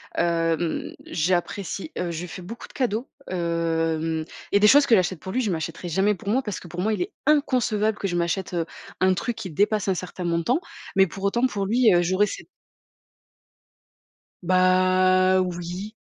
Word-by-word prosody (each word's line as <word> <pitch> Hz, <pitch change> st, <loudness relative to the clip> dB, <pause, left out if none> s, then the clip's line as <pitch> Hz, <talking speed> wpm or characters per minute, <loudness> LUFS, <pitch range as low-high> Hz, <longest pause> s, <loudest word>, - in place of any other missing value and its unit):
hem, 165 Hz, -1 st, 0 dB
j'apprécie, 180 Hz, -, -2 dB
heu, 175 Hz, -1 st, -2 dB
je 170 Hz, +1 st, -4 dB
fais 185 Hz, -, -8 dB
beaucoup 220 Hz, +7 st, -9 dB
de -, -, -19 dB
cadeaux, 245 Hz, -2 st, -1 dB, 0.2 s
hem 165 Hz, -2 st, -1 dB, 0.3 s
et 200 Hz, -, +4 dB
des 210 Hz, -, +6 dB
choses 285 Hz, +5 st, +7 dB
que 235 Hz, -, +4 dB
j'achète 185 Hz, -3 st, 0 dB
pour 190 Hz, -, -6 dB
lui, 255 Hz, -, 0 dB
je 215 Hz, -6 st, 0 dB
m'achèterai 165 Hz, +2 st, -4 dB
jamais 195 Hz, +5 st, +2 dB
pour 205 Hz, -, -14 dB
moi 240 Hz, +6 st, +2 dB
parce 210 Hz, -, -4 dB
que 175 Hz, -, -12 dB
pour 175 Hz, +2 st, -5 dB
moi, 215 Hz, -, +1 dB
il 205 Hz, -4 st, -1 dB
est -, -, -3 dB
inconcevable 235 Hz, -8 st, +2 dB
que 195 Hz, -, -2 dB
je 175 Hz, -, -1 dB
m'achète, 175 Hz, +2 st, -1 dB
heu, 165 Hz, -2 st, 0 dB, 0.3 s
un 185 Hz, 0 st, +4 dB
truc 230 Hz, +5 st, -3 dB
qui 210 Hz, -4 st, -6 dB
dépasse 205 Hz, +4 st, +1 dB
un 190 Hz, -, +3 dB
certain 180 Hz, 0 st, -6 dB
montant. 170 Hz, -, +1 dB, 0.4 s
Mais 195 Hz, -1 st, +6 dB
pour 195 Hz, +4 st, -9 dB
autant, 240 Hz, +6 st, +2 dB
pour 200 Hz, -5 st, -3 dB
lui, 230 Hz, 0 st, +4 dB
heu, 175 Hz, -, +4 dB
j'aurais 185 Hz, +4 st, +2 dB
cette -, -, -7 dB, 2.0 s
Bah 185 Hz, +1 st, +4 dB
oui. 180 Hz, +3 st, -4 dB
185 Hz, 185 wpm, -24 LUFS, 170-210 Hz, 2.0 s, choses